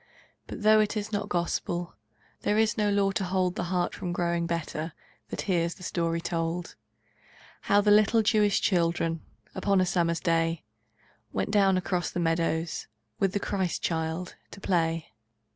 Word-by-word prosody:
But - - -7
though 215 0 +6
it 215 +1 +1
is 210 +1 -3
not 205 0 -2
Gospel, 175 0 -2 0.5
There 210 - +1
is 220 -1 +3
no 210 -1 +1
law 200 -1 +2
to 195 +1 -1
hold 185 -1 0
The 180 - -3
heart 180 0 0
from 175 - -4
growing 170 -1 0
better 165 -1 -3 0.4
That - - -3
hears 170 -3 0
the 185 - -13
story 170 -1 -1
told: 165 +1 -2 1.0
How 205 +1 +6
the 205 0 +3
little 215 +2 +5
Jewish 210 -2 +3
children 165 -3 +1 0.3
Upon 200 -2 +2
a 185 - +3
summer 170 -2 +1
day, 165 -1 0 0.7
Went 95 0 -1
down 195 -2 +4
across 180 -1 -1
the - - -4
meadows 165 0 0 0.3
With 195 -1 +1
the 205 - +1
Child - - -5 0.8
Christ - - -17
to - - -11
play. 165 -7 0
180 Hz, 160 wpm, -28 LUFS, 170-200 Hz, 1.0 s, though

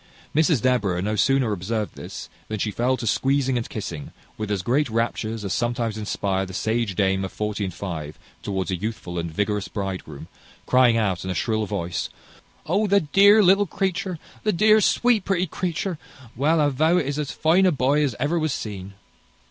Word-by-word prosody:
Mrs 155 -5 +3
Deborah 115 -9 +1
no 105 +4 -1
sooner 130 +2 +2
observed 105 +3 -2
this - - -8 0.2
than 110 - -3
she 105 +1 -1
fell 125 +4 0
to 120 - -5
squeezing 135 +3 +1
and 120 -1 -2
kissing, 85 -9 -6 0.2
with 110 -1 -5
as 100 -3 -1
great 135 +6 +1
raptures 115 -1 -2
as 95 - -1
sometimes 120 -2 -1
inspire 100 -3 -1
the 95 -1 -7
sage 110 -2 -1
dame 95 0 +1
of 95 - -4
forty 105 -1 -3
and 95 - -5
five 80 -6 -5 0.2
towards 95 -1 -2
a - - 0
youthful 90 -3 -4
and 85 0 -3
vigorous 105 +3 -1
bridegroom, 95 -8 -5 0.4
crying 125 -2 +4
out, 100 -6 0
in 95 - -5
a 90 - -2
shrill 110 -1 0
voice, 90 -4 -3 0.6
"O, 200 +6 +1
the 200 0 +4
dear 200 +8 +6
little 195 +2 +5
creature! 185 0 -2 0.2
The 215 - +1
dear, 215 +4 +5
sweet, 235 0 +3
pretty 185 -2 +1
creature! 175 0 -3 0.4
Well, 155 +6 +2
I 145 -1 +3
vow 155 +6 +2
it 170 - +1
is 140 +2 -2
as 145 -2 -2
fine 175 +4 +3
a - - +4
boy 145 +1 +2
as 135 -6 -1
ever 165 +4 +1
was 155 -3 0
seen!" 100 -2 -7
115 Hz, 190 wpm, -23 LUFS, 100-155 Hz, 0.6 s, dear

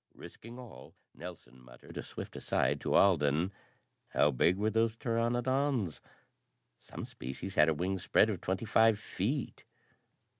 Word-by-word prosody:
Risking 115 +2 -11
all, 125 -3 -12 0.2
Nelson 80 -8 -11
muttered - - -14
a - - -3
swift - - -8
aside - - 0
to - - 0
Alden. 85 -1 +3 0.5
"How 75 - +3
big 85 +8 +2
were 105 +2 +1
those 115 0 +1
pteranodons?" 120 - 0 0.8
"Some - - -8
species 65 +9 -7
had 75 -3 +5
a 80 - +1
wing 95 +4 -1
spread 105 +4 +3
of 95 - -5
twenty 95 +4 -2
five 110 0 +4
feet." 110 +6 -3
100 Hz, 140 wpm, -32 LUFS, 85-115 Hz, 0.8 s, had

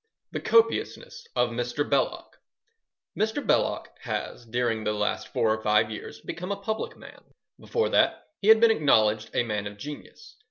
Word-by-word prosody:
The - - -3
Copiousness 480 +1 +1
of 120 -1 +2
Mr. 120 +4 -2
Belloc - - -1 0.8
Mr. 220 +7 -1
Belloc - - 0
has 120 - -5
during 115 -1 -1
the 105 - 0
last 105 0 -1
four 110 -1 +1
or 110 - -9
five 110 0 +3
years 105 - -8
become 180 +3 -6
a - - 0
public 220 +2 -4
man. - - -14 0.4
Before 460 - -1
that - - +2
he 200 - -3
had 220 0 +8
been 230 0 +6
acknowledged 110 - +3
a - - +3
man 105 -3 -3
of 100 0 -9
genius. 150 - -10
120 Hz, 165 wpm, -26 LUFS, -, 0.8 s, had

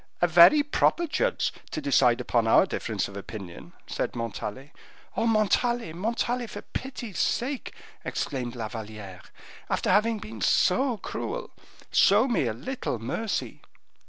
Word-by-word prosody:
"A - - +4
very 175 - +7
proper 320 +3 +2
judge - - 0 0.2
to - - -3
decide 130 -4 +3
upon 115 -2 +1
our - - +6
difference - - -2
of 100 - -11
opinion," 100 -3 -9
said - - -3
Montalais. 115 +3 -5 0.4
"Oh! 230 - +1
Montalais, 225 -2 +1
Montalais, 235 +6 -1
for 205 - -8
pity's 245 -7 -6
sake," 265 +2 -1 0.3
exclaimed 125 -3 -3
La 115 -3 -3
Valliere, 105 -4 -8 0.5
"after - - +1
having 220 +2 +3
been 110 - -9
so 245 - +3
cruel, 485 - -5 0.4
show 210 +6 +5
me 235 - +1
a 110 - -1
little 155 - -4
mercy." 165 - -3
175 Hz, 135 wpm, -27 LUFS, -, 0.5 s, very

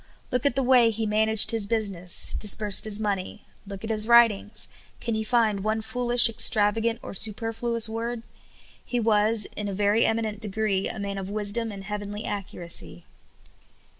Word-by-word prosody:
Look 250 +1 0
at 280 - -2
the 270 - 0
way 245 -2 +4
he 220 0 -3
managed 215 0 +2
his 225 -3 -1
business; 195 -6 +2
disbursed 210 -1 +2
his 215 -1 +1
money. 205 -1 -4 0.2
Look 195 0 -9
at 225 - -4
his 215 0 -1
writings; 230 -3 +3 0.3
can 235 - -4
you 220 0 -2
find 220 -3 0
one 220 +1 -2
fool 245 +2 -5
ish, 245 0 +8
extravagant, 225 +1 +1
or - - -8
superfluous 225 +3 +2
word? 230 +1 -5 0.6
He 245 - -3
was, 215 -1 +1
in 210 - -5
a 200 - -5
very 205 +3 +1
eminent 220 -2 -2
degree, 210 -2 -2
a - - -7
man 200 -1 -5
of 190 0 -7
wisdom 215 +2 -1
and 195 -1 -9
heavenly 205 +1 -7
accuracy. 170 - -4
215 Hz, 165 wpm, -24 LUFS, 205-230 Hz, 0.6 s, ish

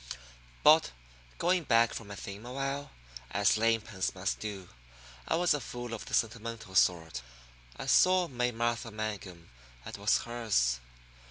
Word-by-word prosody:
But, 155 +2 +7 0.5
going 180 +1 +2
back 115 -2 +4
from 115 - -7
my 100 - -7
theme 100 +1 -8
a - - -7
while 135 +1 -3 0.4
as 100 +6 +3
lame 115 +1 +2
pens 100 -4 -3
must 95 0 -2
do 100 -4 -6 0.6
I - - +1
was 175 +1 +3
a 145 - -1
fool 120 -1 -6
of 115 - -6
the - - -1
sentimental 115 -2 -2
sort. 80 -8 +2 0.6
I - - -5
saw 185 -1 +5
May 125 -3 -1
Martha 120 0 -1
Mangum, 105 - -6 0.3
and - - -7
was 100 +1 +2
hers. 110 - +1
115 Hz, 155 wpm, -31 LUFS, 100-125 Hz, 0.6 s, But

